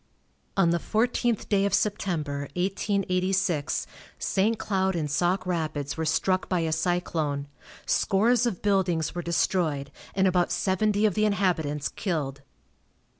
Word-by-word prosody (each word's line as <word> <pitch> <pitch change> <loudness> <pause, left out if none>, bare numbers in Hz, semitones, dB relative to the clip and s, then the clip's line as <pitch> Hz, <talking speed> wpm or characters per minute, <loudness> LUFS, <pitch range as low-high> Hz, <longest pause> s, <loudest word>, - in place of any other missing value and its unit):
On 180 -3 +4
the 170 - +1
fourteenth 235 +2 0
day 200 -2 +2
of 200 - +2
September, 155 -9 -1
1886, 185 -3 0 0.3
St. 215 +4 +1
Cloud 190 -3 0
and 150 -4 -2
Sauk 175 +4 +1
Rapids 155 -5 -2
were 160 - -2
struck 185 +4 +1
by 180 -2 +1
a 160 -1 -1
cyclone. 160 -4 -1 0.4
Scores 230 +4 +3
of 195 -7 -4
buildings 190 -5 +1
were 175 - -3
destroyed, 165 -4 0 0.2
and 190 0 +3
about 180 -1 +2
seventy 200 +4 +1
of 210 - +3
the 215 +2 +2
inhabitants 170 -8 0
killed. 145 -8 -3
180 Hz, 130 wpm, -27 LUFS, 160-200 Hz, 0.4 s, On